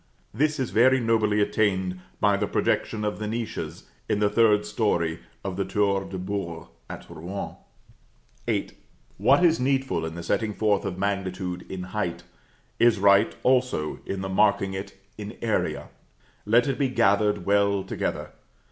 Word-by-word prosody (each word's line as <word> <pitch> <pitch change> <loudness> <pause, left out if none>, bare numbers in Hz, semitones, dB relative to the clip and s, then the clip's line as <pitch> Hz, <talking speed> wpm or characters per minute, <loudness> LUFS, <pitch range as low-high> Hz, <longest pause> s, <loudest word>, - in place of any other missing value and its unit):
This 150 +6 +1
is 130 - -2
very 130 +4 +5
nobly 110 -3 +2
attained 95 -3 0 0.2
by 105 -1 +3
the 100 +1 -1
projection 105 +1 0
of 105 - -2
the 105 - -3
niches 115 +1 -4 0.3
in - - +2
the 105 -1 +2
third 105 -2 +4
story 105 -7 0 0.2
of 95 -2 -4
the 100 - +1
Tour 100 0 0
de 95 - -6
Beurre 90 -3 -4 0.2
at - - -8
Rouen. 90 +5 -6 0.9
VIII. - - -1 0.5
What 135 - +5
is 165 -1 +4
needful 135 -9 0
in 80 - -7
the 85 - -6
setting 105 +4 -1
forth 105 -2 +1
of 90 - -3
magnitude 95 -2 -3
in 95 -1 -5
height, 90 -3 -3 0.6
is 120 -2 +5
right 100 0 +4
also 125 -12 +1
in 95 -1 -3
the 95 - -3
marking 100 0 +2
it 95 0 -6 0.2
in 105 0 -7
area 110 -2 -1 0.6
let 120 +3 +5
it 135 -1 -2
be 135 -2 +2
gathered 105 -4 +2
well 100 -1 +2
together. - - -3
100 Hz, 155 wpm, -25 LUFS, 95-110 Hz, 0.9 s, very